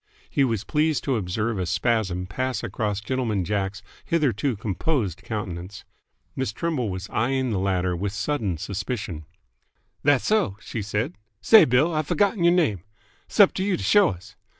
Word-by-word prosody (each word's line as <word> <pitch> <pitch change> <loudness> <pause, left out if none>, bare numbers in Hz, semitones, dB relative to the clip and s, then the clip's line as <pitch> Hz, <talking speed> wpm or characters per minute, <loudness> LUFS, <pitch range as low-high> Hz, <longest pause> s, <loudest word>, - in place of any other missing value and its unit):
He 140 - +2
was 115 -5 0
pleased 155 +4 +1
to 135 - 0
observe 105 +2 -1
a 90 - -2
spasm 95 -2 0
pass 130 +8 -3
across 105 -2 -2
Gentleman 110 -5 -1
Jack's 100 +2 -2 0.2
hitherto 140 -6 0
composed 105 - -2
countenance. 95 -3 -6 0.5
Miss 130 -5 -1
Trimble 130 -2 -2
was 95 +1 -5
eyeing 130 +2 0
the 100 - 0
latter 95 -2 0
with 95 +3 -2
sudden 110 - -2
suspicion. 95 -3 -4 0.8
"Thasso!" 145 - +2
she 110 - -5
said. 105 - -2 0.2
"Say, 220 - +7
Bill, 130 +7 +3
I've 155 -1 -1
f'gott'n 200 -2 +2
y'r 170 - +6
name 160 - +2 0.5
'sup 205 -3 +5
to 190 - -2
you 195 -2 +1
to - - -6
show 205 -3 +5
us! 90 +1 -9
110 Hz, 155 wpm, -24 LUFS, 95-145 Hz, 0.8 s, Say